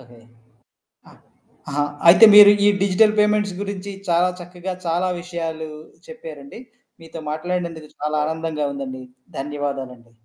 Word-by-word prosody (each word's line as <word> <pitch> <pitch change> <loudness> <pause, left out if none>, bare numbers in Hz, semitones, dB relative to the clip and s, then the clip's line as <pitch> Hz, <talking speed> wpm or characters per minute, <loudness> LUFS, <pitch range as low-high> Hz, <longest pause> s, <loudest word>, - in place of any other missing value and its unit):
Okay. 120 -2 -18 0.9
ఆ! - - -18 0.6
ఆహా, 145 +1 0 0.3
అయితే 180 +6 +8
మీరు 205 -1 +10
ఈ - - +6
డిజిటల్ 200 +2 +3
పేమెంట్స్ 210 -2 +1
గురించి 200 -1 -6 0.2
చాలా 175 +2 +3
చక్కగా 180 +1 -7
చాలా 175 +2 0
విషయాలు 165 -3 -6 0.4
చెప్పారండి. 480 - -11 0.4
మీతో 165 0 -10
మాట్లాడినందుకు 165 -1 -4
చాలా 150 +1 -2
ఆనందంగా 160 -1 -3
ఉందండి. 130 -2 -7 0.3
ధన్యవాదాలండి. 135 -4 -6
170 Hz, 115 wpm, -21 LUFS, 150-195 Hz, 0.9 s, మీరు